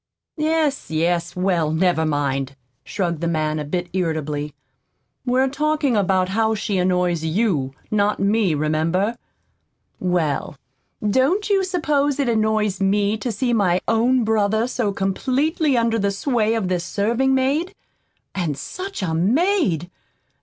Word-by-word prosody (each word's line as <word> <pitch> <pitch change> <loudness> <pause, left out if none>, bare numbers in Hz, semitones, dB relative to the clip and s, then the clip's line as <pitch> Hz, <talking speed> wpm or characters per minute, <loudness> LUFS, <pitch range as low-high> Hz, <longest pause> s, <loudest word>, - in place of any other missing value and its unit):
"Yes, 310 -2 0
yes; 170 +2 0
well, 180 -4 +1
never 160 -1 +2
mind," 140 -2 -1 0.3
shrugged 170 -5 -2
the 170 - 0
man, 155 -2 -1
a - - -2
bit 175 +4 -3
irritably. 150 -5 -2 0.7
"We're 255 +2 +3
talking 300 -1 0
about 185 -2 +2
how 220 +2 +1
she 200 -2 -1
annoys 180 -2 +1
YOU, 160 - 0 0.2
not 210 0 +1
me, 200 -4 +2
remember." 160 +8 0 0.8
"Well, 170 -6 -1 0.5
don't 285 - +2
you 390 -1 +3
suppose 295 -6 0
it 275 - +1
annoys 215 -3 +1
me 200 +2 +2
to 240 +2 -3
see 240 +3 -1
my 185 -5 +2
own 240 +3 +3
brother 220 0 +1
so 235 -5 -1
completely 260 - 0
under 230 -1 +1
the 200 0 +1
sway 225 +1 0
of 220 -5 -1
this 180 -2 -1
serving 235 +8 +1
maid? 295 +9 0 0.6
And 165 -7 -2
such 370 - -6
a 165 -3 -1
maid! 210 - +1
200 Hz, 135 wpm, -21 LUFS, 170-255 Hz, 0.8 s, We're